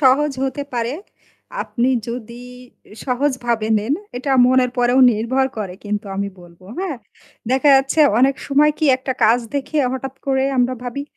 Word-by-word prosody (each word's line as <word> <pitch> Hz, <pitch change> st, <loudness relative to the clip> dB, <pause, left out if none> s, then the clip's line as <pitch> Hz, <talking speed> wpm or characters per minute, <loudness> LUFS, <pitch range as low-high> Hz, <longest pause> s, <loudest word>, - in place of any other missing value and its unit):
সহজ 280 Hz, +2 st, +3 dB
হতে 270 Hz, +1 st, -3 dB
পারে, 235 Hz, +1 st, -1 dB, 0.7 s
আপনি 245 Hz, 0 st, -1 dB, 0.2 s
যদি 235 Hz, 0 st, -7 dB, 0.6 s
সহজভাবে 245 Hz, -4 st, -1 dB
নেন। 220 Hz, +8 st, -1 dB, 0.2 s
এটা 260 Hz, +3 st, -3 dB, 0.2 s
মনের 255 Hz, 0 st, +3 dB
পরেও 245 Hz, +1 st, +3 dB
নির্ভর 240 Hz, +5 st, 0 dB
করে 195 Hz, -4 st, -5 dB
কিন্তু 205 Hz, 0 st, -3 dB
আমি 200 Hz, 0 st, -2 dB
বলব 170 Hz, 0 st, -17 dB, 0.2 s
হ্যাঁ? 360 Hz, -8 st, -3 dB, 0.5 s
দেখা 265 Hz, +3 st, +3 dB
যাচ্ছে 270 Hz, +3 st, +2 dB, 0.2 s
অনেক 270 Hz, +2 st, +4 dB
সময় 290 Hz, +2 st, +4 dB
কি -, -, 0 dB
একটা 260 Hz, 0 st, -3 dB
কাজ 225 Hz, +3 st, +5 dB, 0.2 s
দেখে 285 Hz, +2 st, -2 dB
হঠাৎ 265 Hz, 0 st, -5 dB
করে 265 Hz, -1 st, +1 dB
আমরা 250 Hz, 0 st, +2 dB
ভাবি, 250 Hz, +3 st, -5 dB
255 Hz, 150 wpm, -19 LUFS, 235-270 Hz, 0.7 s, কাজ